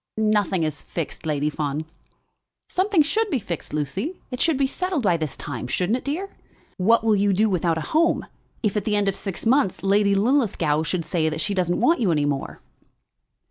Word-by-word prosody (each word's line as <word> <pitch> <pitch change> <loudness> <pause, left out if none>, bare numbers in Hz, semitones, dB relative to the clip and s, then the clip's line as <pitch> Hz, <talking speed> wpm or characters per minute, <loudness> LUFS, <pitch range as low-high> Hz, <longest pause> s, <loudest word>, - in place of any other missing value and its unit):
"Nothing 210 -5 +2
is 155 -2 -2
fixed, 165 -1 -5
Lady 150 0 0
Fawn." 150 +1 -3 0.8
"Something 370 -3 +3
should 430 +8 0
be 285 - +1
fixed, 180 -8 -5
Lucy. 150 - -2 0.2
It 250 - -3
should 325 -4 +2
be 275 - +2
settled 350 +1 -2
by 180 -4 +3
this 155 -4 -3
time; 125 -4 -5
shouldn't 185 - 0
it, - - -16
dear? 325 +8 -2 0.5
What 225 +5 +3
will 220 -2 +3
you 200 0 +2
do 215 +4 +3
without 170 -2 +1
a - - -2
home, 320 - +1 0.4
if 210 -2 +1
at 210 - -1
the 210 - +1
end 205 -1 +1
of 195 - +2
the - - -9
six 195 0 -5
months 250 -6 +2
Lady 200 +1 +3
Linlithgow 195 - +2
should 165 +1 -2
say 160 -3 0
that 155 0 -4
she 200 - -1
doesn't 180 -2 0
want 320 +6 +4
you 205 -7 +2
any 150 -2 +1
more?" 140 -2 -3
195 Hz, 205 wpm, -23 LUFS, 160-250 Hz, 0.8 s, want